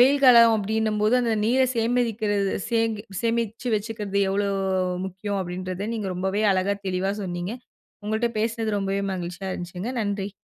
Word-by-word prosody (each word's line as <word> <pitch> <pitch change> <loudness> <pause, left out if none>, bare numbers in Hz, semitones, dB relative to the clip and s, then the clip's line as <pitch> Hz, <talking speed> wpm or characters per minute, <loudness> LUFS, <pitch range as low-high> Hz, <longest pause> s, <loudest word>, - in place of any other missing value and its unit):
வெயில் 275 +3 +5
காலம் 235 -2 +8
அப்படின்னும்போது 215 +1 +1
அந்த 230 -1 +1
நீரை 255 +3 +3
சேமிக்கிறது, 225 -4 +1 0.2
சே 230 -1 +2 0.4
சேமிச்சு 230 +1 -1
வச்சுக்கிறது 210 -2 -4
எவ்வளோ 200 +1 +1 0.6
முக்கியம் 195 +2 -4
அப்படின்றத 185 +3 -4
நீங்க 210 -3 -3
ரொம்பவே 190 +3 -1
அழகா 190 +2 +1
தெளிவா 190 +2 0
சொன்னிங்க. 175 +3 -4 0.5
உங்கள்ட்ட 220 +2 0
பேசினது 225 -1 0
ரொம்பவே 195 0 -1
மகிழ்ச்சியா 180 +1 -5
இருந்துச்சுங்க. 180 +6 -5
நன்றி. 205 -1 -2
210 Hz, 130 wpm, -25 LUFS, 190-230 Hz, 0.6 s, காலம்